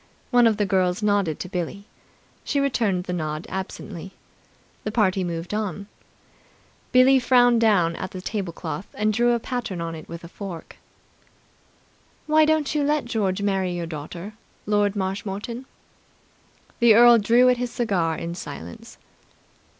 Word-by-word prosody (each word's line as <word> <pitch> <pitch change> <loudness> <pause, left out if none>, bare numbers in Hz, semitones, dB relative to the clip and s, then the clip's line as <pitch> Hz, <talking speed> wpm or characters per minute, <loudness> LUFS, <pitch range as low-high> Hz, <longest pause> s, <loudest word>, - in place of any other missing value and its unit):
One 245 -2 +6
of 220 -2 +2
the 210 - +1
girls 185 0 +1
nodded 200 -7 +1
to - - -5
Billie. 185 +2 -4 0.6
She 285 - -1
returned 225 -10 0
the 180 - -4
nod 155 -2 -3
absently. 190 -1 -6 0.7
The 215 - -3
party 195 -4 +2
moved 170 +1 -4
on. 200 -2 -3 1.1
Billie 260 +1 +6
frowned 245 -2 +4
down 180 -7 +3
at 185 - -5
the 185 - -8
tablecloth 190 -1 -5
and 215 +1 +1
drew 240 +2 +3
a 235 - +1
pattern 230 -7 -4
on 165 0 -4
it 160 - -10
with 170 0 -8
a - - -8
fork. 180 -2 -9 1.5
"Why 310 0 +4
don't 310 -2 +1
you 300 - +1
let 295 -1 +1
George 200 -5 -1
marry 190 -3 0
your 170 -1 -3
daughter, 165 +5 -7 0.3
Lord 205 -1 +1
Marshmoreton?" 205 +5 -4 1.1
The 235 -3 +6
earl 240 0 +8
drew 235 +4 +4
at 250 - +3
his 245 0 -3
cigar 180 -9 0
in 170 0 -5
silence. 140 - -9
200 Hz, 150 wpm, -24 LUFS, 180-235 Hz, 1.5 s, earl